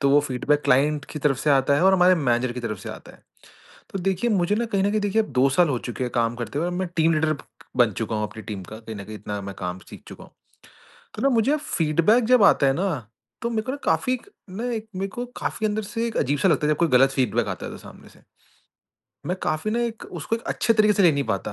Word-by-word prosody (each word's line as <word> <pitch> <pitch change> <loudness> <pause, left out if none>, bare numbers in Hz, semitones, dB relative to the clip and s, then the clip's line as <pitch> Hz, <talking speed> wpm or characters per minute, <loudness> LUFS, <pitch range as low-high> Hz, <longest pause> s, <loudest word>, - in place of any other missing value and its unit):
तो 140 -1 +3
वो 145 +1 +6
feedback 145 +1 0
client 145 +2 +2
की 155 - -5
तरफ 140 -2 +2
से 150 - +1
आता 135 0 +4
है 160 - +1
और 190 - +6
हमारे 185 0 +5
मैनेजर 125 -5 0
की 125 - -6
तरफ 110 -4 -4
से - - -8
आता - - -11
है, - - -20 0.7
तो 195 - -4
देखिए 195 +5 0
मुझे 195 -1 +2
ना 235 - 0
कहीं 200 -4 0
न 200 - +2
कहीं 215 +1 0
देखिए 205 +2 +1 0.2
2 135 - +5
साल 170 +5 +3
हो 130 -4 0
चुके 125 - -3
हैं 125 - -4
काम 115 0 +1
करते 120 +3 -4
हुए 175 +2 -1
मैं 180 +1 -2
टीम 165 +1 +3
लीडर 155 0 +1 0.4
बन 120 -3 +4
चुका 110 0 -3
हूँ 105 - -1
अपनी 110 - -10
टीम 105 -3 -6
का, 105 +4 -10
कहीं 110 -1 -8
न 100 - -7
कहीं 110 +2 -8
इतना 105 0 -5
मैं 100 0 -7
काम 90 0 -4
सीख - - -11
चुका - - -11
हूँ। - - -18 0.8
तो - - -4
ना 275 - +4
मुझे 250 +4 +2
फीडबैक 170 - +2
जब 250 0 +4
आता 145 - +5
है 135 - +4
ना, 190 +6 0 0.5
तो 235 - -1
मेरे 220 -2 -1
को 255 - -4
ना 285 - -5
काफ़ी 255 - +1
एक 250 - -8 0.2
ना 205 +6 -5
एक 220 -1 -5
मेरे 195 +1 -2
को 245 - -2
काफ़ी 220 - -2
अंदर 215 +1 -1
से 230 +3 -3
एक 230 - -5
अजीब 145 +3 +1
सा 190 - +3
लगता 150 -3 +2
है 150 - +3
जब - - -1
कोई 170 - +3
गलत 135 0 +5
फीडबैक 135 -2 0
आता - - -5
है - - -6
तो - - -9
सामने - - -14
से। - - -21 1.1
मैं 180 - -1
काफ़ी 155 +7 -1
ना 235 - 0
एक 230 -2 -4 0.2
उसको 225 - -1
एक 230 - -11
अच्छे 230 - +2
तरीके 215 -1 +4
से 200 - +3
ले 170 - +6
नहीं 140 -1 -1
पाता 100 +1 -4
155 Hz, 275 wpm, -24 LUFS, 125-210 Hz, 1.1 s, वो